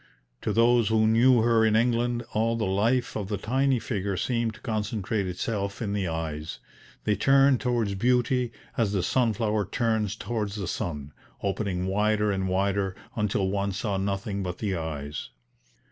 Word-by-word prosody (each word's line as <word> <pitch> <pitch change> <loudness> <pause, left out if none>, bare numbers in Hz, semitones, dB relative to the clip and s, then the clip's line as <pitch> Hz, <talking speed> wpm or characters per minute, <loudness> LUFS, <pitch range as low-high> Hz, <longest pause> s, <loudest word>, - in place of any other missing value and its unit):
To - - -1
those 115 -1 +4
who 110 0 +3
knew 115 +2 +5
her 115 -1 +4
in 110 -1 +3
England, 120 +1 +1
all 115 +2 +1
the 115 - -1
life 110 +7 +1
of 105 -3 -3
the 105 0 -2
tiny 130 +6 +1
figure 100 -4 -2
seemed 115 -1 -1
to - - -14
concentrate 105 -3 -2
itself 100 +2 -3
in 105 -4 -2
the 100 -3 -1
eyes; 80 -1 -4 0.5
they 105 - +2
turned 135 +3 +4
towards 120 -5 0
beauty 125 +3 +1 0.3
as 110 -4 +1
the 95 -3 0
sunflower 110 -3 +1
turns 110 -4 0
towards 110 -3 -3
the 100 -4 -4
sun, 75 -3 -4 0.3
opening 95 -2 -1
wider 105 +2 +1
and 95 -1 -1
wider 95 0 0 0.2
until 105 -3 0
one 100 0 -1
saw 100 +1 -2
nothing 100 +1 -2
but 90 -2 -4
the 100 -3 -2
eyes. 75 -3 -5
105 Hz, 160 wpm, -27 LUFS, 95-115 Hz, 0.5 s, knew